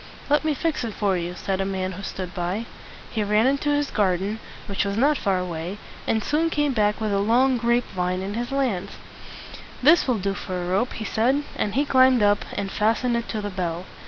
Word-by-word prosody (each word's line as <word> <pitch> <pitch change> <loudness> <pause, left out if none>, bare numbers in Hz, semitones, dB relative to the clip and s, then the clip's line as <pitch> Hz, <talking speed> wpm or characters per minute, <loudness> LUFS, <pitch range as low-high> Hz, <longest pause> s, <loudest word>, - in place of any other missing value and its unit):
"Let 295 - +4
me 310 -1 +1
fix 315 -1 -1
it 225 -3 -4
for 200 -3 +1
you," 175 0 -3
said 190 +2 -2
a - - +2
man 190 -1 -2
who 190 +2 -7
stood 185 -2 -5
by. 185 +4 -2 0.5
He 220 - 0
ran 210 +2 +3
into 280 +2 +1
his 290 -1 +1
garden, 200 +1 0 0.3
which 200 - -1
was 200 0 -2
not 285 +5 +4
far 195 -7 0
away, 180 +1 -4 0.3
and 220 -1 +1
soon 320 +3 +1
came 295 -3 +1
back 210 -2 +1
with 215 -2 -1
a 200 - +2
long 245 +5 +3
grape 235 +1 +2
vine 180 +1 -1
in 200 +1 -4
his 240 +2 -3
hands. 235 -9 -1 0.9
"This 310 +4 +6
will 250 -3 +2
do 195 0 -1
for 185 -2 -4
a 175 - -3
rope," 195 +7 0
he 220 - -5
said; 255 +8 +1
and 205 - -2
he 285 +2 +2
climbed 260 -4 +5
up, 205 0 +3
and 200 -1 -3
fastened 230 +3 +1
it 235 0 -2
to 215 - -2
the 205 0 -4
bell. 175 -1 -3
210 Hz, 220 wpm, -24 LUFS, 190-255 Hz, 0.9 s, This